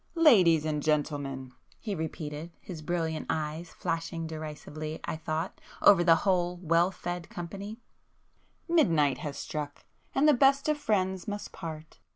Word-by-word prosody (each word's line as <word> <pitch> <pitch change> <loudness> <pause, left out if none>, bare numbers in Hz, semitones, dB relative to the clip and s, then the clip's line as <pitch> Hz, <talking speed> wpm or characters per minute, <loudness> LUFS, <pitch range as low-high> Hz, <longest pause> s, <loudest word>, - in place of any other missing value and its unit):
"Ladies 185 - +6
and 150 -1 -1
gentlemen!" 145 -4 -1 0.3
he 210 - -3
repeated, 160 -1 -5
his 170 -5 -8
brilliant 160 -1 -2
eyes 155 +2 -2
flashing 165 0 -3
derisively, 155 0 -6
I - - -3
thought, 160 +2 -3 0.2
over 190 -4 +7
the 165 -1 +7
whole 180 -2 +2
well 170 0 +3
fed 175 -2 -5
company, 200 +5 -6 0.9
"Midnight 165 - +3
has 145 -2 -5
struck 150 -2 -5 0.3
and 285 +3 +4
the 300 - +7
best 275 +2 +4
of 305 -1 +1
friends 190 -8 0
must 205 0 -4
part! 160 -1 -8
165 Hz, 140 wpm, -29 LUFS, 155-190 Hz, 0.9 s, over